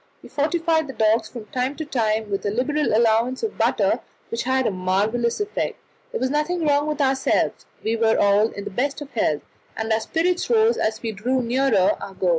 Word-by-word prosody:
We - - -12
fortified 320 +1 +1
the 270 - -7
dogs 220 0 +2
from 235 -4 -8
time 255 +2 -1
to 315 - -5
time 220 -6 -1
with 195 - -1
a - - 0
liberal 285 +8 0
allowance 230 +3 +2
of 440 - -2
butter, - - +2 0.3
which 230 - -2
had 260 0 +1
a - - +2
marvellous 205 - 0
effect. 415 0 -2 0.3
There 480 - -3
was 260 - 0
nothing 315 +3 0
wrong 290 0 +2
with 305 -1 -2
ourselves; 265 -1 +1 0.2
we 225 +1 0
were 225 -1 +2
all 205 +2 +4
in 200 - -7
the - - -6
best 275 +8 -1
of 285 -1 -8
health, 155 -10 0 0.3
and 220 0 0
our 220 - +2
spirits 345 +9 0
rose 455 0 +4
as 220 +1 -1
we 225 - -2
drew 245 +5 -1
nearer 235 -5 +2
our 195 - -8
goal. 185 -1 0
245 Hz, 210 wpm, -23 LUFS, 220-295 Hz, 0.3 s, all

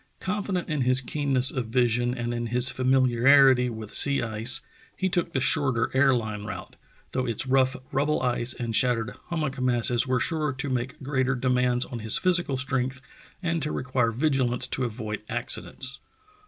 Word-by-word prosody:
Confident 195 -2 -3
in 150 -3 -2
his 130 +1 +3
keenness 135 -1 +3
of 125 -4 -4
vision 120 +1 +1
and 120 -1 -3
in 120 0 -3
his 125 +2 +2
famiharity 130 0 +4
with 110 -2 -8
sea 140 -3 +4
ice, 115 +4 -1 0.4
he 190 - -1
took 175 -2 0
the 135 - -1
shorter 130 -3 +2
air 135 +1 +4
line 110 -4 -2
route, 105 - -8 0.4
though 130 0 -2
its 115 +2 -1
rough 130 0 +2 0.2
rubble 145 +3 0
ice 125 0 -1
and 115 -3 -4
shattered 120 -1 +1
hummock 155 -7 -3
masses 120 0 +2
were 130 -1 +1
sure 155 -1 -1
to 135 +2 -4
make 125 0 -3
greater 135 -1 0
demands 125 0 +1
on 120 - -7
his 110 -1 +4
physical 175 -7 +1
strength 130 0 -2 0.4
and 165 -1 -1
to 150 - -2
require 125 -2 -1
vigilance 130 -1 0
to 130 0 -2
avoid 110 -3 -5
accidents. 130 +3 -3
130 Hz, 170 wpm, -25 LUFS, 120-135 Hz, 0.4 s, famiharity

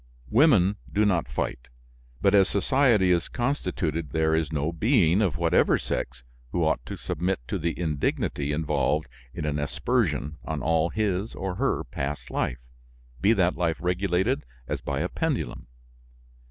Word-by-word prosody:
"Women 110 - +5
do 105 +6 +2
not 90 -5 +1
fight; - - -3 0.6
but 100 - +4
as 100 -1 +5
society 105 -3 +3
is 85 -1 +2
constituted 85 - -2
there 80 +3 +1
is 80 -1 0
no 75 +1 -1
being, 100 - +3
of 95 -9 +1
whatever - - +3
sex, 65 - -4 0.3
who - - 0
ought - - +1
to - - -5
submit 90 +2 -2
to - - -1
the 85 +1 -2
indignity 75 -3 -1
involved 75 0 0 0.2
in 75 - -5
an 75 -1 -1
aspersion 70 +1 -1
on 75 -5 -4
all 80 0 +2
his 105 +1 -1
or 95 -1 -3
her - - 0
past 70 +4 -5
life, - - -1 0.6
be 105 - +5
that 90 -4 +2
life 85 -3 0
regulated 90 - 0 0.2
as - - -3
by 70 0 -2
a 90 - 0
pendulum. 160 - -3
85 Hz, 155 wpm, -26 LUFS, 75-100 Hz, 0.6 s, Women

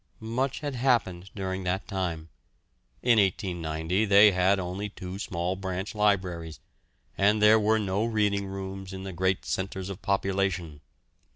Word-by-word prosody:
Much 130 +3 -1
had 145 -2 -3
happened 115 -8 0
during 95 -1 -3
that 90 +2 -2
time. 85 -5 -3 0.7
In 120 -2 +5
1890 90 -1 0
they 100 +1 +7
had 95 +2 +3
only 95 +3 -4
two 95 -1 -8
small 90 -2 -2
branch 95 +1 -4
libraries, 90 -6 0 0.6
and 105 +2 +4
there 105 +1 +6
were 110 +1 +3
no 100 0 0
reading 105 -3 0
rooms 95 0 -6
in 95 0 -6
the 95 -1 -6
great 95 +2 0
centres 95 0 -3
of 95 - -8
population. 95 -5 -1
95 Hz, 145 wpm, -27 LUFS, 90-105 Hz, 0.7 s, they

